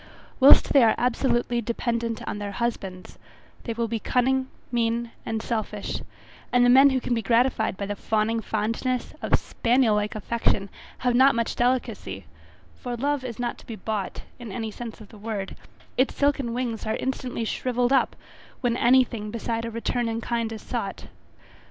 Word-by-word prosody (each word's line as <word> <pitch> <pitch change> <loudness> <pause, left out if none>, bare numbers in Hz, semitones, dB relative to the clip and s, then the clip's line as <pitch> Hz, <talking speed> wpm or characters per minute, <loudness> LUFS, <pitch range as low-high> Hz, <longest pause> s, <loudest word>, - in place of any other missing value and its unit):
Whilst 270 +2 +8
they 280 - +7
are 225 -2 +5
absolutely 240 -1 +1
dependent 235 0 -2
on 205 - -3
their 205 -1 -4
husbands, 195 -5 -4 0.5
they 230 - -2
will 230 0 -1
be 225 0 -2
cunning, 260 +3 +1 0.2
mean, 235 0 0 0.2
and 225 0 -2
selfish, 215 -3 -3 0.5
and 245 0 +5
the 245 - +6
men 270 +2 +8
who 265 -1 +1
can 245 - -2
be 230 - +1
gratified 230 -3 +2
by 200 - -3
the 205 +1 -3
fawning 220 +2 0
fondness, 230 +4 -2
of - - +3
spaniel 240 -1 +2
like 210 0 0
affection, 210 -2 0 0.3
have 245 - +4
not 260 +2 +6
much 230 -1 -1
delicacy, 230 - -1 0.5
for 245 -1 -4
love 285 +2 0
is 240 -4 -5
not 245 -1 -3
to - - -17
be 230 - -5
bought, 215 -3 -4 0.2
in 235 -4 -7
any 220 +2 -4
sense 230 0 -8
of 215 - -13
the 215 - -14
word, 205 -2 -4 0.4
its 260 - +2
silken 280 -4 +1
wings 235 -2 -3
are 220 - 0
instantly 255 -3 -3
shrivelled 245 +2 0
up 270 - +3 0.5
when 240 -2 +1
any 255 +2 +5
thing 215 -4 -6
beside 230 +1 -3
a - - -3
return 230 +1 -1
in 225 0 -2
kind 230 -1 -2
is 220 - -7
sought. - - -4
235 Hz, 175 wpm, -25 LUFS, 220-245 Hz, 0.5 s, Whilst